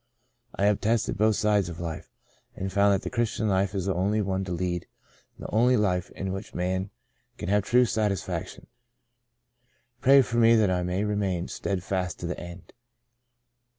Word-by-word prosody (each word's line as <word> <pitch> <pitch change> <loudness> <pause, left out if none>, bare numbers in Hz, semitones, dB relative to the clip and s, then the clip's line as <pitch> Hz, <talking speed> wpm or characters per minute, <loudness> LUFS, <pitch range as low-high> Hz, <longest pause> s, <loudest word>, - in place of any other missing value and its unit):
I 100 - +1
have 105 -1 +2
tested 115 +1 +1
both 110 +1 +3
sides 105 -4 +1
of 85 - -8
life, 85 -2 -6 0.4
and 95 0 -4
found 100 +1 +4
that 95 - +1
the - - -4
Christian 115 -2 -1
life 95 0 +1
is 95 -2 -2
the 95 - +1
only 100 +4 0
one 95 -2 -1
to 90 - -6
lead 90 0 -2 0.5
and - - -10
the - - -6
only 120 +3 +4
life 90 -4 0
in 95 0 -3
which 95 +2 -7
a - - -6
man 95 +2 -1 0.5
can 85 - -5
have 105 +1 +3
true 125 +5 +3
satis 105 -5 0
faction. - - -6 1.4
Pray 135 +1 +7
for 120 -1 -3
me 115 0 +6
that 105 -4 +3
I 90 -1 0
may 90 +3 -1
remain 100 -4 -1
steadfast 95 -2 -3
to - - -4
the 90 - -4
end.'' 85 0 -10
100 Hz, 185 wpm, -26 LUFS, 90-105 Hz, 1.4 s, Pray